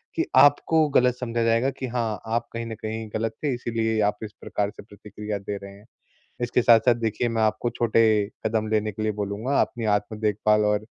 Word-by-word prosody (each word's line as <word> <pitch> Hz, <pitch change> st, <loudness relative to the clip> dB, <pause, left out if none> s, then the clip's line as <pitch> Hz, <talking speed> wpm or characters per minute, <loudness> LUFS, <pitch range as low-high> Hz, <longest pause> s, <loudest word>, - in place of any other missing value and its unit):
कि -, -, +1 dB
आपको 150 Hz, +2 st, +5 dB
ग़लत 125 Hz, -3 st, +3 dB
समझा 115 Hz, -2 st, -1 dB
जाएगा 115 Hz, +3 st, +2 dB
कि 130 Hz, -, -6 dB
हाँ, 115 Hz, -4 st, -2 dB
आप 115 Hz, +1 st, -1 dB
कहीं 115 Hz, 0 st, -4 dB
न 110 Hz, -, -5 dB
कहीं 110 Hz, 0 st, -4 dB
ग़लत 110 Hz, 0 st, -1 dB
थे 145 Hz, -3 st, +1 dB
इसीलिए 115 Hz, -2 st, -1 dB
आप 105 Hz, 0 st, +1 dB
इस 105 Hz, -, -6 dB
प्रकार 100 Hz, -1 st, -2 dB
से 105 Hz, -, -13 dB
प्रतिक्रिया 105 Hz, 0 st, -7 dB
दे 100 Hz, +1 st, -5 dB
रहे 100 Hz, 0 st, -10 dB
हैं। 105 Hz, -, -19 dB, 0.6 s
इसके 120 Hz, 0 st, +1 dB
साथ-साथ 120 Hz, +1 st, +5 dB
देखिए 115 Hz, +1 st, -1 dB
मैं 115 Hz, -1 st, -1 dB
आपको 110 Hz, +2 st, 0 dB
छोटे 115 Hz, -1 st, +2 dB, 0.4 s
कदम 110 Hz, 0 st, -1 dB
लेने 110 Hz, 0 st, 0 dB
के 110 Hz, -, -5 dB
लिए 110 Hz, -, +1 dB
बोलूँगा 105 Hz, +7 st, -1 dB
अपनी 115 Hz, -2 st, -3 dB
आत्म 105 Hz, +1 st, -4 dB
देखभाल 105 Hz, 0 st, +2 dB
और 105 Hz, 0 st, +1 dB
110 Hz, 205 wpm, -24 LUFS, 105-120 Hz, 0.6 s, आपको